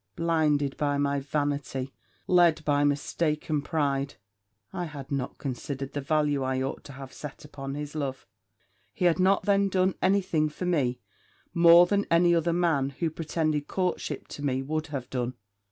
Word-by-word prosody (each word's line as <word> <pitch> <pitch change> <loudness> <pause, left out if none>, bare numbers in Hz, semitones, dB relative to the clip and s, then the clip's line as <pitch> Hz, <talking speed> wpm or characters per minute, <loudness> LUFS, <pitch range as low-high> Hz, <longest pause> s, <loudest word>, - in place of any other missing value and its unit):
Blinded 155 -4 +1
by 145 -1 0
my 140 0 +1
vanity 140 -2 -2 0.3
led 175 -3 +4
by 145 -1 +2
mistaken 150 +1 0
pride 140 -3 -1 0.6
I 175 - -3
had 145 -4 -9
not 135 -2 -3
considered 135 +1 -5
the 145 - -2
value 145 -1 +1
I 130 0 0
ought 135 +1 -3
to 140 - -10
have 135 0 -10
set 150 +1 -9
upon 135 -2 -6
his 150 0 -5
love. 140 -4 -4 0.7
He 180 - 0
had 175 0 +3
not 190 +2 +3
then 200 0 +3
done 185 0 +2
any 200 +1 +3
thing 155 -4 0
for 165 +4 -6
me 140 -9 0 0.5
more 170 +1 +8
than 200 +2 0
any 175 +1 +4
other 170 0 +2
man, 165 -6 +1
who 165 -2 -1
pretended 155 -2 -1
courtship 180 -6 -2
to 145 - -7
me, 135 -2 0
would 155 +3 -2
have 135 -5 -5
done. 125 -1 -2
150 Hz, 170 wpm, -27 LUFS, 140-170 Hz, 0.7 s, more